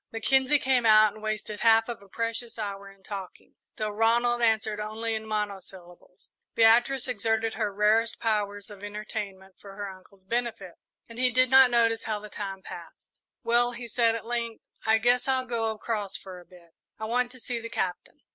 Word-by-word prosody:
Mackenzie 265 +5 +3
came 260 -3 +1
out 215 -1 +6
and 215 - -13
wasted 215 -1 -4
half 225 0 +5
of 235 -4 -6
a 200 - -17
precious 230 +2 -4
hour 200 -2 -5
in 195 -1 -19
talking, 195 -2 -8 0.2
though 215 -1 -2
Ronald 235 +3 +2
answered 220 -2 +1
only 220 +2 -3
in 220 0 -4
monosyllables. 190 -4 -6 0.2
Beatrice 240 +4 +4
exerted 225 -1 0
her 215 -2 -1
rarest 215 +3 +2
powers 205 -2 -1
of 205 -1 -12
entertainment 205 -2 -6
for 195 -1 -11
her 205 0 -5
uncle's 190 +1 -18
benefit, 225 -4 -3 0.3
and 230 +1 -10
he 255 0 +4
did 255 +1 +2
not 265 -1 +8
notice 230 -1 +2
how 215 -1 -1
the 210 0 -10
time 195 -2 -6
passed. - - -11 0.3
"Well," 240 +1 +2
he 240 0 -7
said, 230 0 +2
at 230 - -6
length, 235 -1 -3 0.2
"I 220 0 +5
guess 245 +3 +2
I'll 260 -1 +1
go 230 -2 -1
across 215 -2 -3
for 185 -2 -10
a 175 - -16
bit. 175 -2 -18 0.3
I 220 - -5
want 245 +2 0
to 255 - -13
see 240 0 -3
the 230 0 -7
Captain." 180 -5 -4
220 Hz, 185 wpm, -27 LUFS, 205-235 Hz, 0.3 s, not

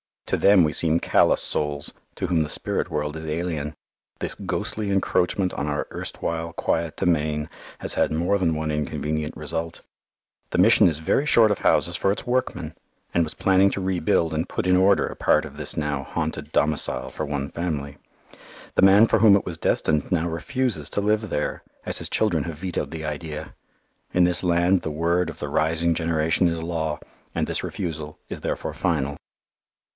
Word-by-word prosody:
To - - 0
them 100 -3 +6
we 75 -1 +1
seem 80 0 +3
callous - - +3
souls, 75 -1 -1 0.2
to - - -3
whom 85 -3 +2
the 75 - -2
spirit - - -2
world 75 0 -2
is 80 - -7
alien. 80 -2 -3 0.4
This - - -2
ghostly 105 -2 -3
encroachment 95 -1 +1
on 70 - -3
our 75 0 -2
erstwhile 85 0 -4
quiet 85 -2 -1
domain 75 -2 0 0.3
has - - -2
had - - +2
more 85 +6 +1
than 85 -4 +1
one 80 0 -2
inconvenient 75 +1 -2
result. 80 +1 -4 0.7
The - - -1
Mission 105 +2 +6
is 80 -3 0
very 80 - +1
short 115 -7 +5
of 105 - 0
houses 85 0 +2
for 95 - +2
its 100 - -4
workmen, 125 +1 -1 0.4
and 85 - +3
was 80 0 -4
planning 95 0 +4
to 100 - -3
rebuild 85 -3 +1
and 80 +3 -1
put - - -2
in 90 0 +4
order 95 +2 +4
a - - -7
part - - +3
of - - -11
this - - -3
now 75 -2 -1
haunted 80 -1 -4
domicile 75 0 0
for 80 - -4
one 70 -1 -3
family. 75 -5 -3 0.8
The - - +3
man 100 +3 +7
for - - +2
whom 105 -3 +7
it 100 - +1
was 85 -2 -5
destined 75 -1 0
now 85 -1 +1
refuses 125 +8 -2
to 100 - 0
live 105 +1 +1
there, 75 - -2 0.2
as - - +2
his - - -5
children 85 -9 +1
have 80 -3 -6
vetoed 90 +1 -3
the 80 -1 -6
idea. 75 0 -5 0.6
In 90 - +4
this 90 +1 +1
land 90 +1 +3
the 80 - -4
word 85 +3 +1
of - - -9
the - - -4
rising 80 +2 +1
generation 80 +1 +1
is 85 -1 -2
law, 80 -2 -2 0.4
and - - +1
this - - -2
refusal 80 -3 -5
is - - -6
therefore - - -3
final. 70 -5 -1
85 Hz, 185 wpm, -24 LUFS, 75-90 Hz, 0.8 s, man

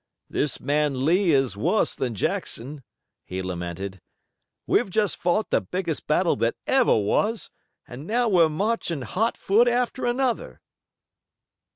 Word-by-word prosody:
"This 145 -3 -1
man 145 -1 0
Lee 180 +4 +3
is 135 - +2
worse 175 - +1
than 125 -3 -3
Jackson," 135 +8 -3 0.4
he 95 +1 -5
lamented. 90 +1 -5 0.6
"We've - - +2
just 210 0 +1
fought 180 +5 0
the - - +3
biggest 175 -4 -4
battle 165 +3 +2
that 115 - 0
ever 265 - +3
was, 205 - 0 0.4
and 130 +6 -9
now 240 +2 +1
we're 175 -6 +4
marching 170 - -1
hot 215 - -1
foot 225 +5 +3
after 245 +1 0
another." 245 0 -1
165 Hz, 135 wpm, -24 LUFS, -, 0.6 s, we're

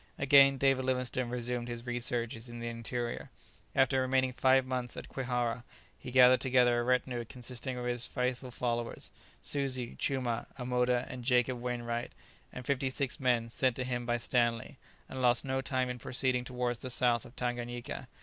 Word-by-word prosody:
Again 135 0 +6
David 135 0 +3
Livingstone 125 -1 -1
resumed 120 0 -2
his 120 0 -6
researches 120 -1 -2
in 120 0 -8
the 120 - -4
interior. 120 +1 -4 0.5
After 135 0 +3
remaining 130 0 +1
five 130 +1 +4
months 125 -2 -3
at - - -7
Kwihara 125 -2 -2 0.4
he - - -8
gathered 125 0 +6
together 125 -2 +4
a - - 0
retinue 125 -1 0
consisting 125 +1 -5
of 125 - -4
his 120 -1 0
faithful 125 0 -2
followers 120 -1 -3 0.3
Suzi, 130 -4 -1
Chumah, 125 -4 -1
Amoda, 125 -1 +1
and 125 -1 -7
Jacob 125 0 +2
Wainwright, 120 -1 -3 0.4
and 125 - -8
fifty 135 0 0
six 135 +2 -2
men 120 -3 +1
sent 130 0 +1
to 130 - -2
him 120 -1 -3
by 120 0 +2
Stanley, 120 0 0 0.3
and 130 - -6
lost 120 -1 +4
no 135 0 -1
time 130 -1 0
in 125 0 -5
proceeding 125 0 0
towards 125 -2 -2
the 130 - -5
south 120 -2 +2
of 120 - -14
Tanganyika. 120 -1 -4
125 Hz, 170 wpm, -31 LUFS, 120-130 Hz, 0.5 s, Again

